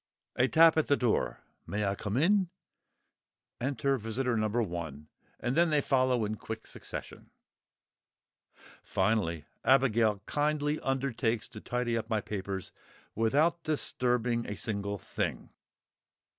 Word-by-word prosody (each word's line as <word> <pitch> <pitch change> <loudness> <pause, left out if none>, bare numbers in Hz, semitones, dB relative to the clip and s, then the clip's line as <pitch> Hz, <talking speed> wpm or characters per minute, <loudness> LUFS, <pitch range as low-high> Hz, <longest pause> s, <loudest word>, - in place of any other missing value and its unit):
A 125 - +3
tap 160 +3 +6
at 160 - +2
the 145 - +3
door; 120 -3 0 0.3
"May 105 +4 -1
I 100 - +1
come 105 +2 -3
in?" 185 +4 +3 1.1
Enter 135 +1 0
visitor 115 +3 -1
No. 110 -1 +1
1. 85 - -3 0.3
And 120 +2 -1
then 170 +1 +4
they 150 -1 +3
follow 130 -4 +2
in 110 +1 -3
quick 110 +1 -6
succession. - - -7 1.5
Finally, 95 -6 0 0.2
Abigail 115 -6 +3
kindly 150 0 0
undertakes 130 -4 -1
to 110 - -9
tidy 120 -1 -1
up 115 0 -3
my 110 -2 +1
papers 95 -2 -4 0.4
"without 145 +10 +2
disturbing 125 -6 0
a 105 - -4
single 100 -2 -2
thing!" - - -4
120 Hz, 125 wpm, -30 LUFS, 105-135 Hz, 1.5 s, tap